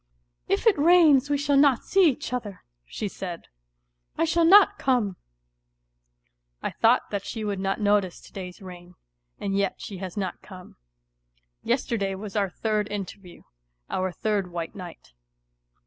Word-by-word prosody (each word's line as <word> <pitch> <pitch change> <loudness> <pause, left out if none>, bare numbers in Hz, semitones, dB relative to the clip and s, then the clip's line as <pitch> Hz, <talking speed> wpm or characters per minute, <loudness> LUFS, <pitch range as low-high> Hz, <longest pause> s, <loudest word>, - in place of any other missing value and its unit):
"If - - 0
it 425 -9 +4
rains 305 -4 +5
we 290 - +2
shall 285 0 +1
not 275 -3 +4
see 380 -4 +4
each 250 -2 -4
other," 210 -6 -5 0.2
she 210 - -4
said, 180 -3 -7 0.3
" - - -45
I - - +2
shall 335 +1 +2
not 405 +3 +6
come." 240 -8 +1 1.5
I - - -2
thought 235 +3 +2
that 200 -2 -2
she 220 +1 -5
would 205 -2 -2
not 195 0 -1
notice 205 -3 +1
to - - -17
day's 185 +1 -8
rain, 180 -1 -11 0.4
and 195 -1 -2
yet 200 -1 0
she 200 - -7
has 190 0 -7
not 190 -3 -3
come. 185 -2 -12
^. - - -22 0.9
Yesterday 230 -6 -1
was 200 +1 -8
our 200 -2 +1
third 210 +1 -2
interview, 195 -2 -7 0.5
our 185 0 -1
third 200 -1 -2
white 170 -1 -5
night. 180 - -11
205 Hz, 160 wpm, -25 LUFS, 185-255 Hz, 1.5 s, not